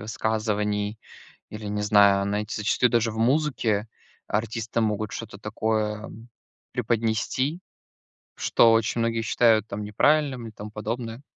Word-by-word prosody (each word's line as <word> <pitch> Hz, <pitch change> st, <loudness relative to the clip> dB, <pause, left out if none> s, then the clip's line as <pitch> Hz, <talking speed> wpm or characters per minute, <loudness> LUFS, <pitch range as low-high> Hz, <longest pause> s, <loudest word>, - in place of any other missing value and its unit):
высказываний. 105 Hz, -1 st, -1 dB, 0.5 s
Или, 110 Hz, 0 st, -8 dB
не 105 Hz, 0 st, -2 dB
знаю, 100 Hz, -1 st, +5 dB
знаете, 105 Hz, +2 st, -2 dB
зачастую 105 Hz, +3 st, +2 dB
даже 115 Hz, -1 st, +1 dB
в 110 Hz, -, -8 dB
музыке 115 Hz, -4 st, +1 dB, 0.4 s
артисты 115 Hz, +2 st, -2 dB
могут 105 Hz, -1 st, -1 dB
что-то 110 Hz, -3 st, -7 dB
такое 110 Hz, 0 st, -2 dB, 0.6 s
преподнести, 120 Hz, +6 st, -1 dB, 0.8 s
что 115 Hz, -, +4 dB
очень 115 Hz, +1 st, +2 dB
многие 115 Hz, 0 st, 0 dB
считают, 110 Hz, -1 st, +3 dB
там, 105 Hz, 0 st, -5 dB
неправильным, 130 Hz, +3 st, +1 dB
и -, -, -9 dB
тому 105 Hz, 0 st, -9 dB
подобное. 115 Hz, +3 st, -5 dB
110 Hz, 120 wpm, -25 LUFS, 105-115 Hz, 0.8 s, знаю